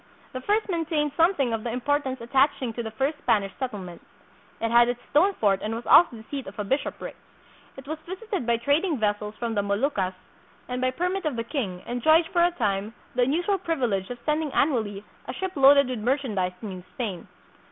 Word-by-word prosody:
The 255 - -4
first 425 +8 +1
maintained 325 -5 0
something 325 -8 +3
of 220 -1 -2
the 240 - -2
importance 260 +2 -1
attaching 260 0 +1
to 235 - -4
the 225 - -4
first 270 +7 -2
Spanish 200 -7 +1
settlement. 200 -10 -5 0.6
It 230 0 -1
had 240 0 +6
its 245 0 -2
stone 370 +7 +4
fort 200 -3 +2
and 220 +1 -3
was 235 - -6
also 335 -8 +6
the 220 - -10
seat 275 -2 -4
of - - -10
a 210 - -2
bishopric. 270 +8 -3 0.6
It 270 0 -11
was 315 +1 -4
visited 380 - -4
by 235 -1 +3
trading 290 +7 +1
vessels 210 -1 -1
from 235 -1 -2
the 205 - +1
Moluccas, 200 -2 0 0.5
and 250 0 -3
by 255 - +2
permit 360 +7 -2
of 300 -5 0
the 230 - -2
king 230 - -4
enjoyed 315 +8 +3
for 345 -1 +4
a 350 - +5
time 210 - -2 0.2
the 250 - +1
unusual 345 +10 +1
privilege 245 - -1
of 245 - -5
sending 300 -1 0
annually 220 -8 0 0.2
a 250 - -4
ship 380 +6 -3
loaded 280 0 +6
with 255 -3 -3
merchandise 215 -7 0
to - - -7
New 185 -3 -7
Spain. 210 -9 -4
250 Hz, 200 wpm, -26 LUFS, 220-300 Hz, 0.6 s, had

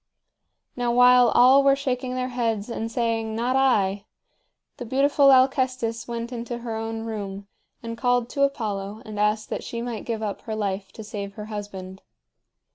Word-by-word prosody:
Now 245 -1 0
while 250 0 +6
all 260 +3 +6
were 275 0 +5
shaking 255 -2 -3
their 255 0 -2
heads 230 -3 -2
and 225 0 -4
saying 225 -2 -1
"Not 245 +3 0
I," 205 -7 +2 0.7
the - - -6
beautiful 275 +3 +3
Alcestis 255 -3 +2
went 235 0 -4
into 240 0 -5
her 225 -2 -3
own 225 0 -4
room 200 -3 -5 0.4
and 230 0 -5
called 245 0 +1
to 280 - -3
Apollo 215 -6 -1
and 215 -1 -7
asked 210 +1 0
that - - -3
she 235 - -5
might 235 -2 -5
give 225 -2 -3
up 205 -2 -4
her 220 - -5
life 195 -2 -3
to 220 - -9
save 200 -1 -6
her 210 - -7
husband. 190 -2 -7
230 Hz, 170 wpm, -24 LUFS, 210-250 Hz, 0.7 s, while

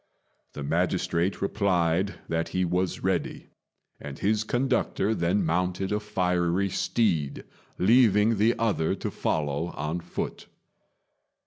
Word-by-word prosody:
The 75 - -6
magistrate 85 +3 0
replied 95 -2 +1
that 80 0 -1
he 90 - +2
was 90 +1 -1
ready; - - -2 0.5
and 70 -1 -8
his 105 +1 +1
conductor 120 -3 0
then 90 0 +1
mounted 90 +3 -1
a 105 - +1
fiery 90 -2 0
steed, 90 -7 0 0.3
leaving 110 0 +4
the 115 +3 +3
other 110 -8 +1
to - - -4
follow 75 +1 -1
on 75 +4 -3
foot. - - -5
90 Hz, 115 wpm, -27 LUFS, 85-105 Hz, 0.5 s, leaving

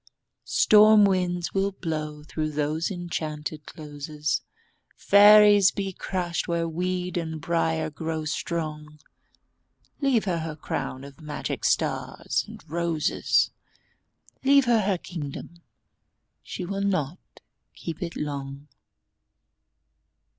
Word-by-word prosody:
Storm 215 0 +6
winds 180 -3 0
will 195 0 +1
blow 155 -4 -4
through 155 0 -3
those 150 +2 -1
enchanted 155 -4 -5
closes, 150 0 -4 0.6
Fairies 205 -1 +7
be 195 -1 -4
crushed 175 -2 -3
where 170 -1 0
weed 180 +2 -2
and 160 -2 -3
briar 160 -1 0
grow 160 +1 -4
strong... 150 -1 -4 1.0
Leave 265 -6 +2
her 175 -4 0
her 160 -1 -5
crown 130 -3 -4
of 140 +2 -12
magic 150 -1 -5
stars - - 0
and - - -12
roses, 165 -1 +1 0.9
Leave 275 0 +5
her 235 -2 +3
her 195 -2 +1
kingdom—she 170 +3 -10
will 195 +2 -3
not 185 -5 -1 0.6
keep 165 -2 -7
it 170 -2 -4
long! 140 -1 -5
165 Hz, 105 wpm, -26 LUFS, 150-185 Hz, 1.0 s, Fairies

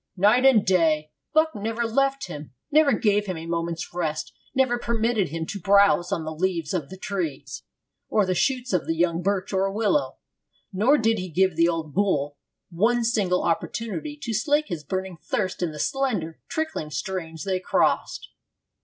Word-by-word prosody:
'Night 215 +8 +5
and 230 -6 +5
day, 160 -5 +2 0.2
Buck 315 +1 +3
never 225 +3 -2
left 275 +4 +1
him, 145 -3 -9 0.2
never 300 -1 +5
gave 210 -2 +2
him 185 -3 -3
a 160 - -7
moment's 170 0 -3
rest, 160 -3 -3 0.2
never 255 -2 +2
permitted 230 -5 0
him 160 +2 -4
to 200 - -5
browse 200 -1 +4
on 165 -5 -1
the 160 - -4
leaves 170 -2 -1
of 160 -7 -2
the 190 - -9
trees 160 -8 -4 0.5
or 210 -2 +3
the 185 - 0
shoots 250 +5 0
of 180 - 0
the 165 - 0
young 170 0 +1
birch 195 +1 -1
or 195 +1 +1
willow. 220 +7 0 0.6
Nor 230 +10 +4
did 225 -3 +1
he 185 0 -5
give 185 +1 +2
the 165 +1 +4
old 160 -3 -3
bull 145 -8 0 0.3
one 230 +8 +2
single 200 -6 +1
opportunity 230 - -2
to 230 - -3
slake 290 +8 +1
his 170 -5 -4
burning 185 +2 -4
thirst 190 -3 -2
in 175 -3 0
the 150 - -9
slender, 205 - -1
trickling 315 - -3
streams 160 +2 -4
they 190 -2 -1
crossed.' - - 0
190 Hz, 175 wpm, -25 LUFS, 165-225 Hz, 0.6 s, Night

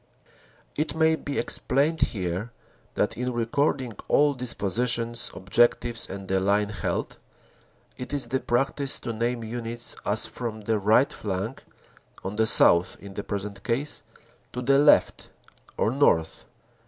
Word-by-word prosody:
It 150 0 -2
may 160 0 +3
be 145 -2 -5
explained 155 +4 0
here 95 +1 -1 0.5
that - - 0
in 125 +1 -2
recording 125 +2 0 0.2
all 145 0 +4
dispositions, 115 -1 0
objectives 120 +4 +1
and 95 0 -7
the 95 0 +1
line 100 +2 +1
held, 105 - -3 0.8
it 125 -1 -7
is 145 -3 +1
the 130 +3 -1
practice 135 +3 -1
to 120 - -4
name 120 +1 -2
Units 115 +1 -2
as 105 +2 +1
from 115 -3 -5
the 110 +1 0
right 110 +7 +3
flank, 105 +5 -4 0.6
on 95 - -4
the 110 +1 +2
south 85 -3 +5
in 100 -1 -11
the 100 - -5
present 100 -1 -5
case, 135 +5 -1 0.5
to 125 - -4
the 135 +2 +4
left, 145 0 +4 0.5
or 110 - +1
north. 120 - +1
115 Hz, 140 wpm, -26 LUFS, 105-135 Hz, 0.8 s, south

